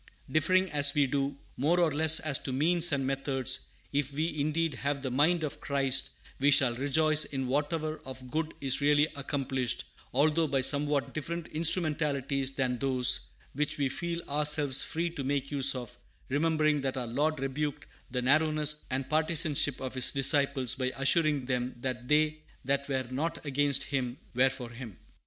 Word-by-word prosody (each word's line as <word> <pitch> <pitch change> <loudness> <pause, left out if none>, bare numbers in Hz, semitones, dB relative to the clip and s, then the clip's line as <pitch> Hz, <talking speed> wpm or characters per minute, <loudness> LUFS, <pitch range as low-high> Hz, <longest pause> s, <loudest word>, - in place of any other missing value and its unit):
Differing, 185 +5 +2
as 145 -1 +3
we 145 -1 +4
do, 140 +1 -2 0.2
more 160 +7 +2
or 170 -3 +3
less 160 +1 +4
as 145 -4 0
to 135 - -5
means 165 +6 +3
and 140 -2 0
methods, 135 -1 -1 0.3
if 145 -1 0
we 155 +3 -2
indeed 155 +2 0
have 140 0 -3
the 130 - -3
"mind 160 +6 +2
of 150 - -5
Christ," 135 -1 0 0.3
we 140 +2 +4
shall 130 -3 +4
rejoice 155 +4 +2
in 135 -2 -4
whatever 155 +4 -2
of 130 -1 -10
good 160 0 -2
is 135 0 +1
really 145 +1 +4
accomplished, 135 -3 -2 0.3
although 155 +4 +2
by 135 -2 0
somewhat 145 +1 +2
different 170 +2 -4
instrumentalities 150 -5 0
than 130 -3 -2
those 130 -2 +3 0.3
which 150 +2 -2
we 140 -2 0
feel 170 +4 -4
ourselves 150 -2 +1
free 170 +1 -2
to 155 -5 -6
make 140 +1 -2
use 135 -1 +3
of, 125 -1 -7 0.3
remembering 155 +1 +1
that 135 -1 -2
our 125 - -2
Lord 145 +6 -1
rebuked 140 +2 -3 0.2
the 125 -1 -3
narrowness 150 +2 +2
and 130 0 -2
partisanship 155 -3 +1
of 130 -1 -5
His 130 -1 +2
disciples 135 -2 +2
by 130 -1 -2
assuring 145 0 +2
them 125 -1 -2
that 125 -1 -4
they 155 +1 +2 0.2
that 140 +1 -1
were 130 -1 -1
not 160 +5 -3
against 140 -1 +1
Him 130 -3 -3 0.2
were 130 +2 +4
for 130 -3 -7
Him. 120 -5 -9
140 Hz, 170 wpm, -29 LUFS, 130-155 Hz, 0.3 s, we